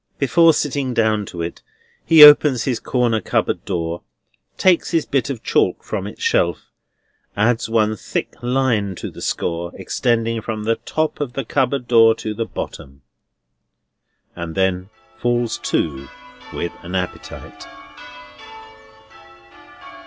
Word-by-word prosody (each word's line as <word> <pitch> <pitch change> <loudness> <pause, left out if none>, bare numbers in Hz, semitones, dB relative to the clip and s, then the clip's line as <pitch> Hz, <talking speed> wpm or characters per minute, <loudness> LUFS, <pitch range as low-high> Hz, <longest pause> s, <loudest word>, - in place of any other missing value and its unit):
Before 165 +4 +4
sitting 140 -4 -2
down 110 -3 +1
to 85 -1 -6
it, 85 - -6 0.4
he 160 -2 +8
opens 145 -4 +7
his 125 -4 -1
corner 120 -4 0
cupboard - - -1
door; 85 -2 -3 0.6
takes 185 -3 +3
his 165 -3 0
bit 135 -2 -1
of 130 -5 -5
chalk - - +1
from - - -4
its - - -9
shelf; - - 0 0.7
adds 115 +1 +1
one 110 -1 +1
thick - - -4
line 120 -6 0
to - - -7
the - - -12
score, 85 0 -3
extending 115 +3 -1
from 110 -1 -5
the 115 +1 0
top 155 -1 -3
of 130 -4 -3
the 135 -1 -4
cupboard 130 0 -1
door 115 -2 +5
to 110 -1 -5
the 115 +2 -3
bottom; 70 -8 -8 1.3
and 85 -1 -6
then 95 0 0 0.3
falls 120 -1 -1
to 70 -3 -2 0.4
with 85 - -4
an 90 +2 -7
appetite. 90 -1 -6
115 Hz, 130 wpm, -20 LUFS, 95-130 Hz, 1.3 s, he